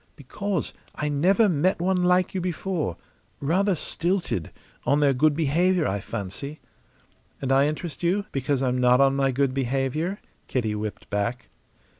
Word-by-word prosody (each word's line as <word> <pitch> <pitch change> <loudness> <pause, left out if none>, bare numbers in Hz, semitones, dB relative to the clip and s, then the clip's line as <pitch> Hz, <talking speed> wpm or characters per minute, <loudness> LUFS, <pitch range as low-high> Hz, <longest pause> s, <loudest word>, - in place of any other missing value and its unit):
"Because 185 +6 -3 0.2
I 150 - -2
never 185 +10 +3
met 180 +1 +1
one 180 +1 +1
like 180 0 +3
you 190 - -1
before. 175 - -2 0.4
Rather 185 +7 +2
stilted 170 - -2 0.3
on 145 - +2
their 145 -2 +4
good 145 +3 +3
behaviour, 165 +4 +2
I 100 +1 -1
fancy." 115 +9 -6 0.8
"And 135 -1 -2
I 135 +2 +5
interest 155 0 -4
you 190 +4 +1
because 135 0 0
I'm 125 -1 +1
not 125 0 +5
on 135 0 +4
my 135 -1 +2
good 135 0 +1
behaviour?" 135 +8 -1 0.3
Kitty 115 -5 -1
whipped 105 -2 -5
back. 115 +4 -2
145 Hz, 150 wpm, -25 LUFS, 130-180 Hz, 0.8 s, I